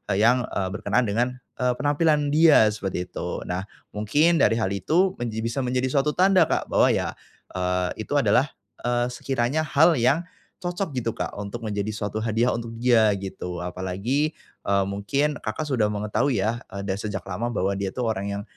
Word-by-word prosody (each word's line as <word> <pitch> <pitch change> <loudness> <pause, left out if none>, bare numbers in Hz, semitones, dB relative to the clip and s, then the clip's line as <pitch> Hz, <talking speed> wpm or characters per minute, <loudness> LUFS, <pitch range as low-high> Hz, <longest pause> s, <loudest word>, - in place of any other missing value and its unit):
yang, 120 +4 +3
eee, 95 -1 -2
berkenaan 105 +4 0
dengan, 120 +4 0 0.2
eee, 125 0 +2
penampilan 145 +1 +2
dia 150 -8 +6
seperti 95 -4 -3
itu. - - -4
Nah, 90 +3 -4 0.2
mungkin 150 +11 +2
dari 115 - +4
hal 110 -4 0
itu 160 - +2
menji 110 -2 -3
bisa 115 +4 -2
menjadi 125 0 0
suatu 150 +2 +1
tanda 190 +1 +5
Kak - - -1
bahwa - - +5
ya, - - +1 0.4
eee, 90 +3 -2
itu - - -2
adalah, 140 -1 +3 0.4
eee, 120 0 +1
sekiranya 135 +4 -1
hal 155 +2 +4
yang 135 +8 +3 0.4
cocok 175 -3 -3
gitu, 115 -2 -1
Kak - - -5
untuk 105 +3 -5
menjadi 105 0 -2
suatu 105 +1 -3
hadiah 115 +2 +1
untuk 115 -1 -5
dia, 115 -3 +4
gitu. 90 -2 -6
Apalagi, 95 - -1 0.3
eee, 100 0 +2
mungkin 135 +10 0
Kakak 135 +8 -3
sudah 115 -7 +1
mengetahui 105 +4 0
ya, 110 +5 -1
eee, 100 +1 -5
dan 95 - 0
sejak 100 -2 -5
lama 110 +6 -3
bahwa 100 -3 0
dia 95 -1 -2
itu - - -8
orang 110 -5 -1
yang - - -6
115 Hz, 180 wpm, -24 LUFS, 100-140 Hz, 0.4 s, dia